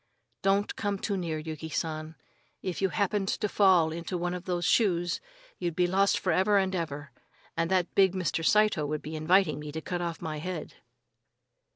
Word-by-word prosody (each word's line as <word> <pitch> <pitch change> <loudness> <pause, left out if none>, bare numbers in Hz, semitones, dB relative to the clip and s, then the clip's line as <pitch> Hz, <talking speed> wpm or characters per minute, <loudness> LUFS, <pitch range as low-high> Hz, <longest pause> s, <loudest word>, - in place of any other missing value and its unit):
"Don't 200 +1 +1
come 205 -1 -1
too 200 +1 -2
near, 170 -4 -2
Yuki 155 0 -6
San. 155 0 -3 0.5
If 185 -1 -3
you 195 - +2
happened 200 0 0
to 210 - 0
fall 185 -6 +4
into 170 +3 -4
one 175 +1 -2
of 180 0 -6
those 175 -2 -1
shoes, 175 -2 +2 0.4
you'd 175 -3 -2
be 180 - +3
lost 195 +2 +3
for 185 - 0
ever 190 +5 +3
and 190 -1 +1
ever, 145 -5 -4 0.4
and 165 0 0
that 185 -2 +1
big 190 -2 +4
Mr. 180 -3 -1
Saito 210 -5 +3
would 150 0 -3
be 155 +1 -6
inviting 155 0 +3
me 150 0 -6
to 160 - -4
cut 175 +2 -4
off 170 -1 -3
my 155 -3 -4
head." 180 -1 -5
175 Hz, 190 wpm, -29 LUFS, 160-190 Hz, 0.5 s, fall